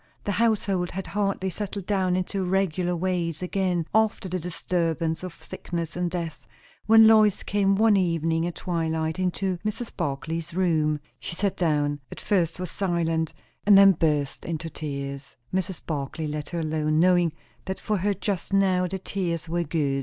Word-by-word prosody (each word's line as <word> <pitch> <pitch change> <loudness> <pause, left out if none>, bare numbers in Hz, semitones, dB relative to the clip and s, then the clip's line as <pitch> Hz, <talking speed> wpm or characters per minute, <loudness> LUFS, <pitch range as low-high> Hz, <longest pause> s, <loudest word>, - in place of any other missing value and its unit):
The 205 - -1
household 200 -4 +1
had 190 +1 -5
hardly 195 -2 -1
settled 200 0 -5
down 190 -3 +1
into 185 +1 -1
regular 180 -1 0
ways 175 -2 -1
again 180 -2 0
after 220 -3 +2
the 185 0 -2
disturbance 165 -1 -1
of 185 -2 -8
sickness 170 -2 -5
and 175 0 0
death, 170 -3 -5 0.4
when 225 0 +8
Lois 215 -2 +5
came 195 -1 +2
one 215 +1 +5
evening 165 -3 +1
at 175 - -5
twilight 160 -1 -1
into 185 0 -1
Mrs. 215 +2 -4
Barclay's 160 +4 -3
room. 155 -5 +2 0.2
She - - -5
sat 195 +1 0
down, 145 -4 +1
at - - -8
first 175 -4 0
was 180 -2 -4
silent, 165 -4 -1 0.3
and 205 -1 +7
then 195 0 +9
burst 150 -5 0
into 165 0 -4
tears. 140 -2 -6 0.2
Mrs. 190 -1 -2
Barclay 155 +1 -3
let 150 -1 -4
her 170 -1 -2
alone, 155 -1 0
knowing 175 -2 +4 0.3
that 190 0 -4
for 215 - -1
her 200 +2 0
just 200 -1 -3
now 185 -2 +3
the 190 +2 -3
tears 175 -4 -3
were 170 +1 0
good. 145 -4 0
175 Hz, 165 wpm, -26 LUFS, 160-190 Hz, 0.4 s, then